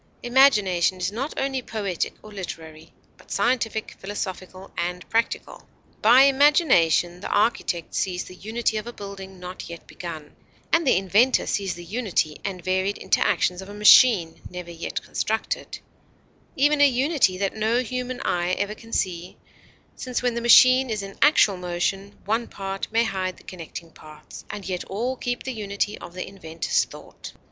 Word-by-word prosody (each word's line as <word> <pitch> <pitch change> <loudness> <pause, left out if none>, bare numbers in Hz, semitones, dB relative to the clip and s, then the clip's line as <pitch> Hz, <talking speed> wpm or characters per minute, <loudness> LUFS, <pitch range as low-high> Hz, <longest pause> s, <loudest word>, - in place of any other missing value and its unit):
Imagination 210 -9 +4
is 185 +2 -2
not 260 +8 -3
only 270 -1 -1
poetic 205 -7 -3
or 215 - -12
literary, 160 -5 -8 0.3
but - - -20
scientific, 225 -3 -1
philosophical, 190 -1 -6
and 180 +1 -3
practical. 230 +1 -2 0.3
By 240 +5 +7
imagination 265 - +4
the - - -6
architect 205 -5 0
sees 180 -2 -1
the - - -12
unity 220 +3 -2
of 215 +2 -5
a 240 - -6
building 195 -2 -9
not 180 0 -8
yet 170 0 -9
begun, 160 -4 -9 0.4
and 330 -3 +3
the 255 - +5
inventor 205 +7 +3
sees 195 -3 -2
the 175 - -9
unity 190 -6 -1
and 190 -3 -5
varied 190 +2 0
interactions 180 +1 +1
of 190 - -10
a 205 - -9
machine 210 -5 +6
never 180 -1 -8
yet 170 0 -5
constructed, 220 +1 -3 0.8
even 290 +2 +3
a 285 - +8
unity 265 - +2
that 195 +1 -2
no 220 +3 +1
human 250 +1 -4
eye 175 +1 0
ever 205 +2 -1
can 225 +1 -15
see, 180 -3 -2 0.6
since 250 -1 -4
when 245 -1 +1
the 235 - -3
machine 255 +2 +7
is 215 -2 -2
in 195 0 -9
actual 265 -9 +5
motion, 180 +3 -3
one 225 +3 0
part 195 0 -5
may 225 +1 +3
hide 190 -4 -3
the - - -18
connecting 165 -1 -9
parts, 155 -1 -13
and 200 -3 -7
yet 180 -2 -3
all 240 +7 -2
keep 245 -1 -3
the 260 - -4
unity 205 -1 -2
of 175 - -11
the 185 - -5
inventor's 165 -4 -1
thought. - - -12
200 Hz, 165 wpm, -24 LUFS, 180-240 Hz, 0.8 s, a